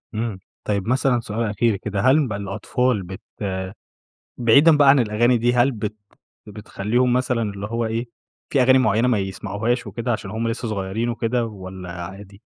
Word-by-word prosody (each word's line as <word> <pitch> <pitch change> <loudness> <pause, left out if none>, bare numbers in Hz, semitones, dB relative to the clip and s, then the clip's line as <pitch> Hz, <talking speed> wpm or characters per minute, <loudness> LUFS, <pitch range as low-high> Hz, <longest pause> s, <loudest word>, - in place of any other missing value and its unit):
إمم، 110 -3 -3 0.2
طيب 100 0 -2
مثلًا 130 -1 +2
سؤال 115 0 -3
أخير 110 +1 +1
كده، 100 +1 -4
هل 135 +5 +4
بقى 100 -3 -3
الأطفال 115 +2 -1
بت 95 +1 -9 1.2
بعيدًا 140 +7 +5
بقى 145 -1 +5
عن 135 0 +7
الأغاني 120 +2 +2
دي، 120 +2 +2
هل 125 +3 +3
بت 105 -1 -4 0.5
بتخلّيهم 105 +4 -1
مثلًا 125 -2 +1
اللي 100 -1 -4
هو 115 +1 -2
إيه، 115 +2 -2 0.5
في 135 -3 +4
أغاني 130 +1 +5
معينة 120 -1 +2
ما 115 -4 +2
يسمعوهاش 100 +5 -2
وكده، 120 +1 -3
عشان 95 -3 -4
هُم 115 +1 -2
لسه 115 0 -3
صغيرين 105 +3 -2
وكده، 120 0 -1
والّا 95 -3 -8
عادي؟ 100 +3 -11
115 Hz, 165 wpm, -22 LUFS, 100-125 Hz, 1.2 s, عن